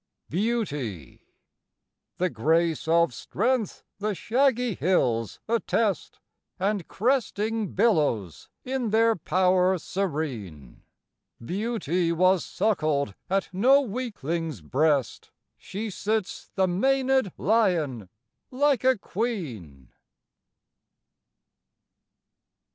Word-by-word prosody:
BEAUTY. 150 - -3 0.9
The 180 0 0
grace 160 +7 +1
of 170 -3 +3
strength 225 - -1 0.2
the 210 0 -1
shaggy 250 +1 +1
hills 125 - 0
attest, 220 -4 0 0.4
And 195 -2 -1
cresting 225 -3 -1
billows 150 - +1
in 255 -3 -2
their 225 +1 +3
power 185 +1 +2
serene; 140 - -4 0.6
Beauty 180 - -1
was 185 +1 +3
suckled 155 - 0 0.2
at 195 +1 0
no 255 +9 +5
weakling's 170 - -4
breast, 140 - 0 0.3
She 210 +3 -6
sits 210 +1 -3
the 190 - +3
manëd 265 +4 +2
lion 165 - +1 0.4
like 275 0 +2
a 260 -1 +4
queen. 130 - -5
185 Hz, 80 wpm, -26 LUFS, 150-225 Hz, 0.9 s, no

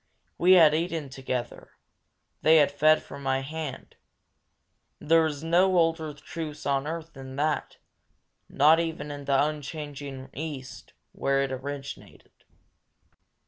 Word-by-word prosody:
We 180 +2 +6
had 160 -5 +7
eaten 165 -3 -2
together; 130 -2 -5 0.7
they 160 +1 +6
had 145 -2 +4
fed 155 +2 +4
from 140 - -10
my 135 -1 0
hand; 150 -1 -7 1.0
and - - -12
there 165 -1 +6
is 145 -1 -6
no 180 +3 +3
older 165 -2 +1
truce 155 0 -7
on 140 0 0
earth 165 0 -5
than 130 -1 -9
that, 150 +2 -1 0.7
not 155 +3 +5
even 160 -3 -3
in 145 -1 -7
the 140 +1 +3
unchanging 145 -3 -6
East, 140 -3 -7 0.2
where 135 0 0
it 135 - -3
originated. 140 +1 -7
150 Hz, 130 wpm, -27 LUFS, 135-160 Hz, 1.0 s, had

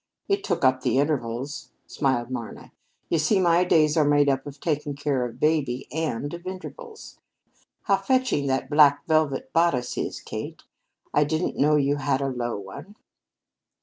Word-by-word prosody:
"It 395 0 0
took 140 - 0
up 130 0 +3
the 130 - +1
intervals," 140 +1 -2 0.2
smiled 130 -3 -1
Marna. 120 -3 -7 0.4
"You 165 - +1
see, 155 +6 +2
my 175 -1 +4
days 155 -4 +3
are 155 - +4
made 145 -1 +3
up 135 +1 -1
of 140 0 -9
taking 150 -2 -2
care 140 -3 -1
of 120 -2 -6
baby, 145 -5 0
and 145 -2 -3
of 170 +1 -8
intervals. 435 - -9 0.6
How - - +3
fetching 255 - 0
that 130 0 0
black 145 -1 +4
velvet 155 -5 0
bodice 165 -7 +1
is, - - -3
Kate. - - -7 0.5
I 150 - +4
didn't 160 +4 -1
know 150 +2 +3
you 145 0 +2
had 135 -1 0
a 140 -1 -1
low 120 -3 -3
one." 100 - -10
145 Hz, 165 wpm, -25 LUFS, 135-160 Hz, 0.6 s, my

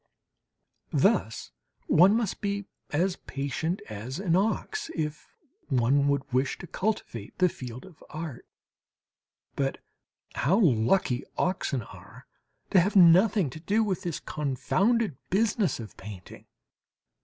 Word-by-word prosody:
Thus - - +1 0.3
one 190 +6 +5
must 230 -5 -2
be 200 -1 -2 0.2
as 180 +5 0
patient 140 +6 -3
as 110 +6 -6
an 180 -3 +1
ox 225 - -1
if 150 -2 -3 0.4
one 135 +2 +2
would 140 -1 +1
wish 130 +1 +1
to - - -9
cultivate 180 - -3
the 185 - +4
field 125 -2 -8
of 185 -5 -16
art. 155 -5 -7 1.1
But 135 -1 -1 0.6
how 190 - +2
lucky 130 - +2
oxen 140 - -1
are - - -14 0.5
to 190 - +6
have 195 +5 +1
nothing 185 - +6
to 155 - -9
do 205 +7 +1
with 190 -3 -1
this 175 -5 -3
confounded 185 - 0
business 200 - +1
of 110 -3 -9
painting! 95 -3 -11
165 Hz, 120 wpm, -27 LUFS, 135-195 Hz, 1.1 s, to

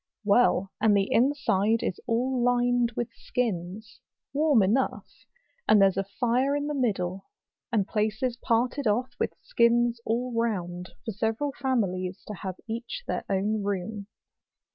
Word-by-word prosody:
Well, 200 -3 +3
and 210 -2 +5
the 195 0 +1
inside 230 -4 +2
is 185 - -2
all 245 +2 +1
lined 245 -1 +2
with 240 -1 -3
skins, 215 -2 -3 0.3
warm 290 -6 +4
enough; 230 +8 -1 0.4
and 215 - +6
there's 195 -1 +5
a 195 - 0 0.2
fire 255 +4 +2
in 290 0 -1
the 295 - -2
middle, 195 - -1 0.4
and 210 -4 +1
places 220 +3 -1
parted 245 +3 0
oft' 245 +5 -1
with - - -1
skins 235 0 +2
all 240 +2 -1
round, 180 -6 -2 0.2
for 225 - -2
several 225 +7 -1
families 195 -9 -1
to 210 - -6
have 190 -1 -5
each 235 - -5
their - - -2
own 205 +2 0
room. 200 +1 -3
225 Hz, 140 wpm, -27 LUFS, 200-245 Hz, 0.4 s, and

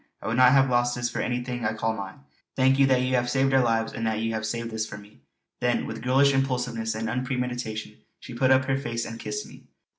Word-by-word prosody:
I - - -12
would 110 +3 -1
not 130 0 +7
have 135 -1 +5
lost 120 -1 +1
this 120 0 -2
for - - -4
anything 125 0 -3
I - - 0
call 110 +1 -1
mine. 95 -7 -8 0.3
Thank 130 +1 +3
you 135 - +6
that 130 -1 +3
you 130 0 -1
have 120 -1 +1
saved 135 +1 +2
our 130 - +5
lives; 115 -1 0
and 115 0 -2
that 110 -1 0
you 115 +1 -1
have 110 0 -2
saved 115 +1 -4
this 110 0 -2
for 105 - -8
me." 105 -3 -16 0.4
Then - - 0
with - - -6
girlish 135 +3 +4
impulsiveness 125 -4 -1
and 110 0 -3
unpremeditation 125 -3 -3 0.2
she - - -10
put 130 +2 +2
up 130 0 +4
her 135 0 0
face 115 -4 -3
and 115 0 -7
kissed 420 - -4
me. - - -15
120 Hz, 245 wpm, -26 LUFS, 115-130 Hz, 0.4 s, not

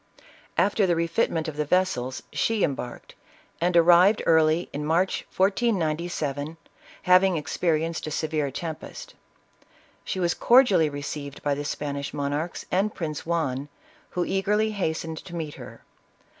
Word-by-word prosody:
After 200 0 +3
the 175 - +2
refitment 165 -1 0
of 155 -2 -6
the 150 - +1
vessels, 145 -6 0
she 225 -3 +1
embarked, 130 -4 -4 0.5
and 175 0 +2
arrived 175 +5 +6
early 160 +1 +3
in 145 - -3
March 170 +5 0
1497, 170 - 0 0.5
having 185 0 +5
experienced 160 +1 -1
a - - -2
se 155 - -2
vere 150 -2 0
tempest. 160 +3 -7 0.9
She 190 - -3
was 175 -1 +1
cordially 235 - +5
received 145 0 -6
by 145 - +1
the 145 +1 -3
Span 145 -1 -3
ish 140 +1 -5
monarchs 145 +4 -3
and 195 +4 +1
Prince 155 -3 -5
Juan, 145 -5 -1 0.5
who 175 - +2
eagerly 210 +3 +1
hastened 160 -5 -3
to 175 - -10
meet 155 -3 -4
her. - - -11
165 Hz, 140 wpm, -25 LUFS, 150-185 Hz, 0.9 s, arrived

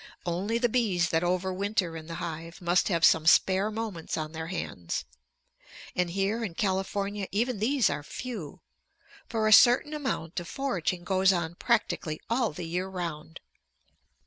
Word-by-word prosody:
Only 185 +6 -1
the 240 +1 +2
bees 205 -8 +1
that 165 +1 +1
over 185 +1 0
winter 195 -3 -1
in 160 -1 -8
the 165 - -6
hive 165 0 -6
must 175 0 +2
have 170 -4 +3
some 160 0 +4
spare 190 +4 +5
moments 215 -6 -4
on 155 -1 -3
their 160 0 -5
hands. 90 - -4 0.9
And 180 -1 +1
here 195 +5 -1
in 185 -7 -4
California 195 +1 -1
even 235 +2 0
these 245 +1 +3
are - - -2
few, 190 - -7 0.7
for 220 -2 0
a 215 - +6
certain 250 +7 +6
amount 260 - -3
of 175 - -8
foraging 185 - -2
goes 190 +1 +3
on 170 -3 -1
practically 175 -7 0
all 235 -1 +2
the 165 +3 -6
year 180 +3 -2
round. 170 -4 -6
185 Hz, 160 wpm, -28 LUFS, 170-215 Hz, 0.9 s, a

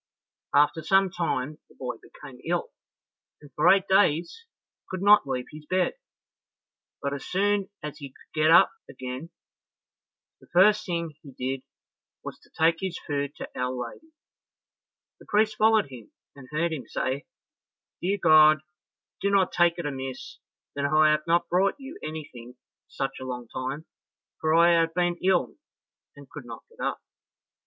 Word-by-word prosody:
After 150 +3 +4
some 195 +3 +3
time 155 -4 -2
the - - -21
boy 125 -3 -5
became 135 -4 -13
ill, 175 +1 -2 0.7
and 145 -1 -16
for 150 - +4
eight 195 0 +4
days 190 - +2 0.4
could 185 0 -4
not 205 -7 +6
leave 125 -2 -2
his 150 0 -12
bed; 185 +2 +1 1.1
but 140 0 -1
as 140 - -5
soon 200 +1 0
as 150 -1 -6
he 140 -2 -7
could - - -23
get 155 - +5
up 165 - +7 0.2
again, 130 +4 -7 1.1
the - - -20
first 210 +4 +4
thing 170 -3 -2
he 140 -3 -13
did 130 +1 -3 0.6
was - - -8
to - - -24
take 165 +1 +2
his 190 -3 -3
food 140 -1 -2
to - - -7
Our 125 0 -1
Lady. 125 - -7 1.1
The - - -17
priest 215 +1 +2
followed 215 -8 +3
him, 120 -4 -11 0.2
and 135 -2 -13
heard 165 +2 0
him 145 - -6
say, 130 +2 -3 0.7
"Dear 195 +3 0
God, 155 -3 +6 0.6
do 200 - +1
not 195 -2 +3
take 175 0 +3
it 170 - -4
amiss 135 -2 -6 0.3
that 140 - -3
I 155 +1 +4
have 150 +1 0
not 170 +1 +2
brought 185 +3 +2
you 285 +7 -10
anything 130 -6 -8
for 125 - -43 0.3
such 135 0 -4
a - - -5
long 125 -2 -5
time, 135 +5 -5 0.5
for 155 0 +2
I 170 +1 +6
have 165 0 -1
been 175 -1 +1
ill 185 -1 +1 0.6
and - - -13
could - - -10
not - - -9
get - - -7
up." - - -2
155 Hz, 165 wpm, -26 LUFS, 140-185 Hz, 1.1 s, up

